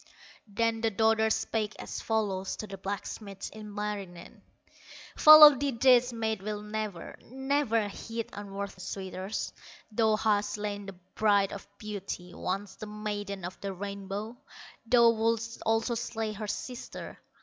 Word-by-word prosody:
Then 225 +2 0
the 225 - +2
daughter 220 +1 +3
spake 215 -1 -1
as - - -6
follows 200 -4 -1
To - - -6
the 195 -2 -9
blacksmith, 200 0 -5
Ilmarinen: 210 -4 -6 0.7
"Follow 305 -1 +11
thee 280 +2 -1
this 250 -1 +6
maid 220 -3 -2
will 210 +1 -4
never, 210 -4 -5
Never 265 -4 +1
heed 225 +3 -5
unworthy 200 -1 -6
suitors; 190 +2 -4 0.4
Thou 220 0 +3
hast 205 -1 +1
slain 205 -1 -4
the 195 - -6 0.2
Bride 205 -2 +3
of 200 - -8
Beauty, 195 -4 -6
Once 195 +1 -4
the 215 - -7
Maiden 205 -2 -4
of 180 - -8
the 195 -1 -3
Rainbow, 200 +3 -5 0.5
Thou 235 -1 +6
wouldst 230 +1 -1
also 225 +2 +2
slay 225 -1 -3
her 215 0 -5
sister. 245 +4 -6
210 Hz, 135 wpm, -29 LUFS, 200-225 Hz, 0.7 s, Follow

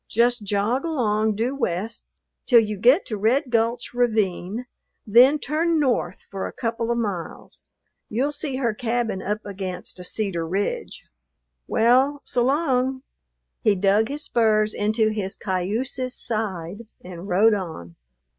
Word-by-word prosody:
Just 240 +1 +2
jog 205 +6 0
along 220 -9 0
due 240 +6 -1
west 220 -2 -3 0.4
till 240 -3 +7
you 215 -1 -1
get 250 - +4
to 215 - -4
Red 245 +6 +1
Gulch 230 +1 0
ravine, 220 -2 0 0.4
then 250 +7 +6
turn 315 +3 0
north 245 - 0
for 195 -1 -3
a - - -7
couple 230 -1 -3
of 235 - +1
miles. 200 -8 -5 0.5
You'll 260 +7 0
see 290 -2 -3
her 240 -4 0
cabin 230 -3 -2
up 210 +2 -3
against 190 -2 -6
a - - -7
cedar 180 -4 -2
ridge. 205 - -3 0.6
Well, 260 +5 +3
so 245 - 0
'long!" 265 -2 +1 0.6
He 210 - +4
dug 200 +3 +3
his 290 +3 -3
spurs 215 -2 +2
into 215 +1 +1
his 205 -3 -3
cayuse's 230 +8 -2
side 210 -2 -4 0.2
and 180 +1 -9
rode 205 +4 +4
on. 160 - -5
225 Hz, 140 wpm, -23 LUFS, 200-250 Hz, 0.6 s, till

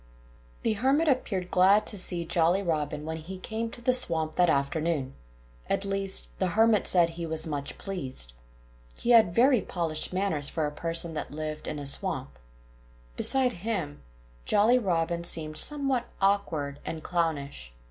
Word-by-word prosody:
The 220 - +2
Hermit 270 +9 +1
appeared 200 -10 -1
glad 195 +3 +4
to - - +2
see 180 -3 +4
Jolly 175 +4 +2
Robin 150 -3 -2
when 160 0 -4
he 175 +4 -8
came 225 +4 -4
to 240 +1 -11
the 255 - +3
swamp 165 -10 +1
that 180 -1 +3
afternoon. 140 -1 -1 0.6
At 195 - 0
least, 195 -1 -1
the 185 +1 -1
Hermit 225 -2 +4
said 175 -2 +4
he 165 0 -6
was 160 0 -2
much 145 -3 -4
pleased. 130 - -4 0.6
He 240 - 0
had 220 -7 +5
very 250 -1 +4
polished 165 -3 -2
manners 180 -6 -1
for 160 -2 -2
a 150 - -3
person 165 +2 -2
that 150 - -4
lived 155 0 -5
in 150 - -3
a 145 - -6
swamp. 140 - -3 0.8
Beside 255 - +3
him, 175 -7 -4 0.4
Jolly 225 - +4
Robin 170 -4 -1
seemed 155 -2 +1
somewhat 275 -4 +1
awkward 165 -8 0
and 160 -1 -6
clownish. 145 - -2
170 Hz, 160 wpm, -27 LUFS, 155-205 Hz, 0.8 s, had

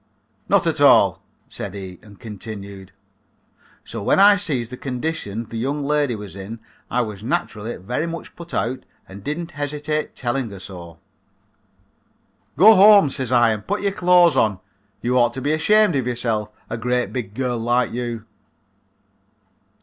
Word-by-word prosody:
"Not - - +3
at - - 0
all," - - +5 0.3
said 95 - -7
he 95 -3 -8
and 105 -2 -16
continued. 100 -3 -9 0.9
"So - - -6
when 100 - +2
I 205 +1 +8
sees 140 - -2
the 125 - -7
condition 125 -4 -4
the 115 - -6
young 140 +4 -2
lady 145 -3 +1
was 105 -3 -9
in 100 +4 -8 0.3
I 125 - +1
was 105 -4 -5
naturally 110 -1 -3
very 125 - -3
much 170 0 -7
put 170 -1 -11
out 130 0 -1 0.3
and 95 +1 -10
I - - -15
didn't 165 +5 -4
hesitate 150 +1 -3
telling 125 -1 -2
her 100 -2 -10
so. 85 -3 -10 1.6
"'Go 210 +8 +9
home,' 200 -5 +7
says 130 -2 -3
I, 120 -2 +4
'and 105 -1 -5
put 205 +2 -1
your 200 - +1
clothes 180 -3 +4
on. 105 -4 +2 0.4
You 125 +1 +2
ought 120 -1 +3
to - - -4
be 145 +3 0
ashamed 210 +4 +3
of 130 -3 -1
yourself 115 -3 -2 0.2
a - - -4
great 125 +2 -1
big 110 -6 -5
girl 125 -2 -2
like 120 +2 +1
you.' 120 -2 -4
125 Hz, 165 wpm, -21 LUFS, 110-150 Hz, 1.6 s, Go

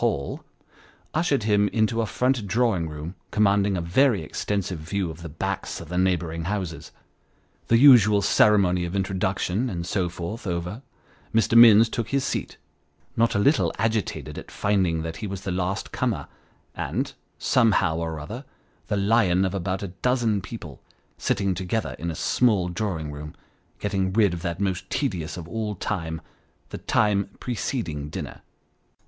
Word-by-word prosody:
239 - - +2 0.2
Hall," - - -28 0.7
ushered 150 -6 +1
him 105 -1 +3
into 110 +2 +1
a 110 - -1
front 125 0 0
drawing 100 -6 +1
room 75 +3 -6 0.2
commanding 100 -2 +2
a - - -1
very 105 - +3
extensive 95 +1 -3
view 85 +2 -2
of 80 +1 -11
the 85 - -7
backs 75 - -3
of 85 - -10
the 90 - -3
neighbouring 85 -3 0
houses. 95 -4 -4 0.8
The 115 - +5
usual 110 -6 +7
ceremony 95 -4 +4
of 85 +2 -5
introduction, 95 +4 -1
and 85 -4 -4
so 90 -1 0
forth, 90 +6 -6
over, 90 +6 -3 0.5
Mr. 115 +1 +3
Minns 115 -1 +9
took 115 0 -3
his 140 -1 +1
seat: - - -3 0.6
not 115 +1 +2
a - - +3
little 140 +9 +3
agitated 110 -4 -2
at - - -11
finding 95 -6 0
that 80 0 -5
he 110 - -4
was 95 -1 -5
the 95 - -3
last 90 +1 -2
comer, - - -1 0.5
and, - - -3 0.2
somehow 110 -9 +3
or 80 -1 -3
other, 110 - -7 0.4
the 105 - 0
Lion 100 -3 +3
of 95 - -2
about 95 +1 -2
a 100 - -4
dozen 115 +1 0
people, 90 - -9 0.4
sitting 100 -1 0
together 95 +4 -2
in 85 - -3
a 80 - -4
small 105 -2 +2
drawing 90 -6 -3
room, 75 +1 -8 0.4
getting 95 -2 -1
rid 105 -4 +4
of 85 - -5
that 85 0 -3
most 95 -2 -2
tedious 90 - -2
of 85 -2 -7
all 105 +3 -3
time, 80 -5 -3 0.5
the - - -6
time 100 -2 +1
preceding 95 - -3
dinner. - - -7
95 Hz, 160 wpm, -25 LUFS, 85-110 Hz, 0.8 s, Minns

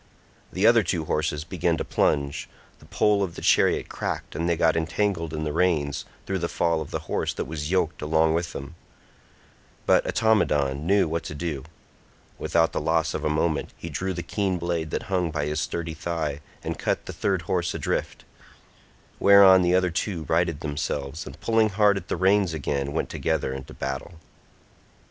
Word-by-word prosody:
The 95 +3 0
other 115 0 +7
two 85 -4 -2
horses 75 -1 -1
began 85 -1 0
to - - -3
plunge; 70 -1 0 0.3
the - - -17
pole 105 -1 +2
of 90 -4 -2
the - - -7
chariot - - +3
cracked - - -4
and 85 +3 -1
they 85 - +1
got 80 -1 +3
entangled 85 +1 -1
in 80 -1 -3
the 75 -1 -2
reins 80 -5 +1 0.2
through 95 0 -2
the 85 - -1
fall 85 -2 +1
of 75 - -6
the - - -3
horse - - -1
that - - -3
was 75 -1 -4
yoked 85 -5 0
along 80 +1 +2
with 85 +1 -1
them; 70 +4 -7 1.1
but - - +4
Automedon 75 -10 +2
knew 100 -1 +4
what 80 +1 -2
to 75 - -6
do; 75 -4 -4 0.7
without 80 -1 +2
the - - -1
loss 80 -1 +1
of - - -3
a - - +1
moment 75 0 0
he 85 - -7
drew 95 +6 -2
the 85 - -4
keen 95 +1 -1
blade 85 -2 -2
that - - -3
hung 90 -3 0
by 75 -2 -2
his 75 +1 -1
sturdy 85 +2 -3
thigh 80 -3 -3 0.2
and - - -4
cut - - -1
the - - -6
third 95 -3 -1
horse 85 0 -1
adrift; - - -3 0.9
whereon 100 -2 +8
the 90 0 +3
other 90 -1 +2
two 85 0 -2
righted 85 -1 0
themselves, 75 0 -3
and - - -10
pulling 115 -1 +3
hard 105 0 +3
at 95 -3 -5
the - - -2
reins 95 -1 +3
again 70 -2 -2
went 80 - -2
together 65 - -1
into 65 0 -8
battle. 70 +5 -5
85 Hz, 185 wpm, -25 LUFS, 75-90 Hz, 1.1 s, whereon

